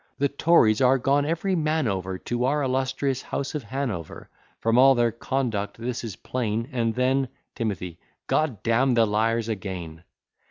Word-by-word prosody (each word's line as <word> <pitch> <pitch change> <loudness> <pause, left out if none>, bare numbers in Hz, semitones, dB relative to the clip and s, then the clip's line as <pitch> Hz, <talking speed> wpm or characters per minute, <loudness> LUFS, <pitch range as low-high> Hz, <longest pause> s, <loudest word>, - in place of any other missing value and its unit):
The 140 0 +1
Tories 140 -7 +4
are 130 +1 +5
gone 140 +3 +1
every 170 +4 0
man 155 -4 +1
over 95 -2 -2
To 120 +5 -2
our 145 +2 +1
illustrious 130 0 -1
house 140 - -4
of 150 - -2
Hanover; 115 - -5 0.3
From 115 +2 +2
all 135 +1 +7
their 120 -1 +2
conduct 115 -3 -2
this 120 +1 -4
is 110 -5 -5
plain; 115 -2 -2
And 115 -3 0
then 130 +1 +2 0.3
T. 115 - -3
G - - +2
d 90 -3 -7 0.7
d 115 - 0
n 130 +3 +3
the 115 -1 +5
liars 110 +2 +1
again! 90 -6 -5
120 Hz, 170 wpm, -25 LUFS, 110-135 Hz, 0.7 s, all